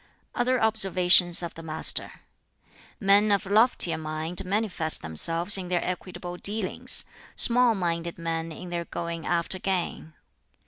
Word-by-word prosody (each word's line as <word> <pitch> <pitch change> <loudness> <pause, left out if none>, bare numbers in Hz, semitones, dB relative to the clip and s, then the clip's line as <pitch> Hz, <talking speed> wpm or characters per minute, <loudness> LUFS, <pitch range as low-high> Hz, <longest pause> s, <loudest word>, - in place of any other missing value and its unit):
Other 255 0 0
observations 185 -5 +4
of 170 - -6
the 165 - -11
Master: 160 -1 -1 0.8
"Men 205 0 +3
of 200 +1 0
loftier 210 -4 +2
mind 155 +2 0
manifest 185 -5 -2
themselves 165 - +1
in 180 -1 -7
their 180 -1 -1
equitable 180 -1 -6
dealings; 205 0 +1 0.3
small 240 -1 +5
minded 170 -2 -4
men 165 -1 -4
in 175 +3 -10
their 170 -1 -4
going 170 -1 -6
after 175 +2 -2
gain. 180 -4 -3
180 Hz, 130 wpm, -25 LUFS, 165-200 Hz, 0.8 s, small